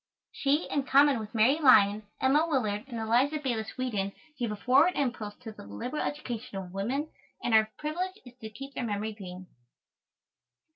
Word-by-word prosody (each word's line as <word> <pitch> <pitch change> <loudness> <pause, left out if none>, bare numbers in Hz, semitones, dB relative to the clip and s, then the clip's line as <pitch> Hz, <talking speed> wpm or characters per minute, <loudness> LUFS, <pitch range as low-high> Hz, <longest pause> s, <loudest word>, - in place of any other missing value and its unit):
She, 285 +3 0
in 285 - +1
common 280 -1 +5
with 215 +1 -8
Mary 245 +8 +4
Lyon, 210 -7 +5
Emma 290 +5 +3
Willard, 220 -8 -1
and 240 -3 -6
Eliza 245 +7 +2
Bayliss 240 -7 -3
Wheaton, 210 -7 -2 0.3
gave 235 -3 -1
a - - -3
forward 270 - +4
impulse 235 -7 -2
to 225 -3 -7
the - - -12
liberal 175 - -4
education 250 -6 -4
of 185 -2 -7
women, 260 +11 -2 0.3
and 240 - 0
our 220 0 +5
privilege 360 +6 -3
is 245 - -12
to 220 - -6
keep 275 +6 -9
their 250 - -3
memory 215 -1 -2
green. 185 -3 -9
240 Hz, 175 wpm, -29 LUFS, 210-280 Hz, 0.3 s, common